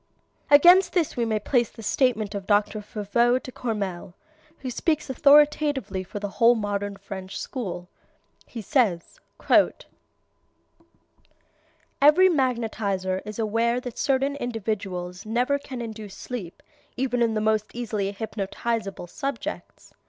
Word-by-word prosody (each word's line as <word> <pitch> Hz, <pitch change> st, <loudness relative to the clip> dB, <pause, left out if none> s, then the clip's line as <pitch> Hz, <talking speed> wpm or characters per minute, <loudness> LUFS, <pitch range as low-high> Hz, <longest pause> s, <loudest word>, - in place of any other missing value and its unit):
Against 350 Hz, +6 st, +7 dB
this 340 Hz, -5 st, 0 dB
we 235 Hz, -, 0 dB
may 220 Hz, -1 st, 0 dB
place 240 Hz, +1 st, +1 dB
the 225 Hz, -, -12 dB
statement 220 Hz, -3 st, +1 dB
of 200 Hz, -2 st, -6 dB
Dr. 205 Hz, +1 st, +2 dB
Foveau 230 Hz, +3 st, +1 dB
de 255 Hz, -, -8 dB
Courmelles, 200 Hz, -8 st, -4 dB, 0.5 s
who 260 Hz, -2 st, -4 dB
speaks 310 Hz, +2 st, -1 dB
authoritatively 285 Hz, -7 st, +3 dB
for 185 Hz, -, -8 dB
the 205 Hz, -, -3 dB
whole 235 Hz, +1 st, +7 dB
modern 205 Hz, -2 st, -3 dB
French 195 Hz, 0 st, -7 dB
school. 185 Hz, -9 st, -5 dB, 0.6 s
He 230 Hz, -3 st, -7 dB
says: 220 Hz, -, 0 dB, 2.8 s
"Every 315 Hz, +7 st, +7 dB
magnetizer 220 Hz, -, -1 dB
is 210 Hz, 0 st, -7 dB
aware 230 Hz, +2 st, +1 dB
that 250 Hz, -1 st, -8 dB
certain 275 Hz, 0 st, +1 dB
individuals 195 Hz, -7 st, -4 dB
never 250 Hz, +5 st, +1 dB
can 260 Hz, -4 st, -7 dB
induce 220 Hz, -3 st, -8 dB
sleep 210 Hz, -9 st, -7 dB, 0.3 s
even 250 Hz, -1 st, 0 dB
in 230 Hz, -2 st, +2 dB
the -, -, +1 dB
most 215 Hz, 0 st, +1 dB
easily 215 Hz, -5 st, -2 dB
hypnotizable 210 Hz, -1 st, -4 dB
subjects. 275 Hz, -, -6 dB
225 Hz, 125 wpm, -25 LUFS, 200-255 Hz, 2.8 s, Against